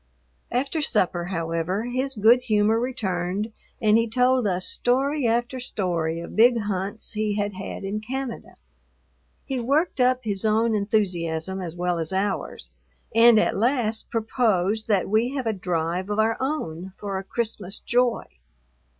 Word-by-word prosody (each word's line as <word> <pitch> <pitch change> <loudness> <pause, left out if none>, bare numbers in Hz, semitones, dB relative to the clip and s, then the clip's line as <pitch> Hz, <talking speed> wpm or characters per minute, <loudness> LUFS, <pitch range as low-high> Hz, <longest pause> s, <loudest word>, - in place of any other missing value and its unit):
After 275 +6 -1
supper, 185 -9 +1
however, 165 +2 -2
his 260 +3 -2
good 230 +4 +5
humor 220 -2 +2
returned 205 -4 -2 0.3
and 215 +1 +4
he 230 0 0
told 250 0 +3
us 185 -1 -1
story 270 +2 +1
after 240 +3 0
story 170 -8 -2
of 170 - -8
big 240 +2 +6
hunts 205 +1 -3
he 215 -1 -1
had 205 0 -1
had 190 +1 -6
in 200 +2 -2
Canada. 255 +1 -5 0.9
He 265 -2 -2
worked 280 +7 +1
up 255 0 +3
his 200 -3 -2
own 220 +1 +2
enthusiasm 190 -4 -1
as 170 -2 -6
well 175 -1 -1
as 160 +1 0
ours, 190 - -2 0.4
and 230 0 +7
at - - +1
last 225 0 0
proposed 220 -3 0
that 200 -4 +2
we 230 +6 +1
have 265 -3 -2
a 225 - +1
drive 180 0 -2
of 205 - -1
our 220 +1 +2
own 190 - -3
for 200 -2 -3
a - - -7
Christmas 215 -2 -2
"joy." 245 -1 +1
215 Hz, 150 wpm, -24 LUFS, 190-240 Hz, 0.9 s, and